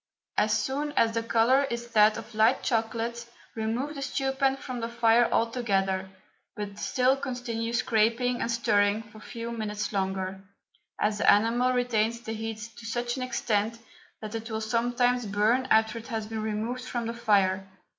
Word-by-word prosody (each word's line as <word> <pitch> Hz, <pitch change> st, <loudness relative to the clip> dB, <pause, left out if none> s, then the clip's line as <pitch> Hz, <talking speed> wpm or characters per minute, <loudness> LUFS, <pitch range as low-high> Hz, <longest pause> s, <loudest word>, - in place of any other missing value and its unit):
As 215 Hz, +1 st, +3 dB
soon 280 Hz, +6 st, -2 dB
as 230 Hz, -5 st, +3 dB
the 230 Hz, 0 st, -1 dB
colour 235 Hz, +4 st, +3 dB
is 235 Hz, -2 st, -5 dB
that 215 Hz, -1 st, +5 dB
of 225 Hz, 0 st, -9 dB
light 220 Hz, +4 st, +3 dB
chocolate 230 Hz, 0 st, -1 dB, 0.3 s
remove 230 Hz, +6 st, -2 dB
the 280 Hz, -, -7 dB
stew 270 Hz, 0 st, -1 dB
pan 270 Hz, 0 st, +1 dB
from 255 Hz, -2 st, -6 dB
the 230 Hz, 0 st, -3 dB
fire 235 Hz, 0 st, +3 dB
altogether, 195 Hz, -5 st, 0 dB, 0.5 s
but 205 Hz, -2 st, -6 dB
still 255 Hz, +1 st, +2 dB
continue 245 Hz, -4 st, -3 dB
scraping 235 Hz, +2 st, +1 dB
and -, -, -1 dB
stirring 210 Hz, -2 st, +2 dB
for 215 Hz, 0 st, -15 dB
a -, -, -16 dB
few 230 Hz, +1 st, -6 dB
minutes 215 Hz, -2 st, -3 dB
longer, 190 Hz, -1 st, -2 dB, 0.6 s
as 210 Hz, 0 st, 0 dB
the -, -, +1 dB
enamel 235 Hz, +4 st, +3 dB
retains 235 Hz, -2 st, +1 dB
the 225 Hz, -2 st, -5 dB
heat 220 Hz, 0 st, -5 dB
to 230 Hz, -, -10 dB
such 240 Hz, +1 st, -2 dB
an 260 Hz, -, -5 dB
extent 230 Hz, -3 st, -1 dB, 0.4 s
that 215 Hz, 0 st, -6 dB
it 225 Hz, +1 st, -5 dB
will 220 Hz, -1 st, -2 dB
sometimes 240 Hz, +2 st, +1 dB
burn 215 Hz, +6 st, +2 dB
after 220 Hz, +1 st, +3 dB
it 230 Hz, -, -12 dB
has 225 Hz, -4 st, -3 dB
been 220 Hz, 0 st, -4 dB
removed 220 Hz, +4 st, -3 dB
from 240 Hz, -2 st, -3 dB
the 230 Hz, -, -3 dB
fire. 195 Hz, -5 st, +2 dB
230 Hz, 175 wpm, -28 LUFS, 215-245 Hz, 0.6 s, that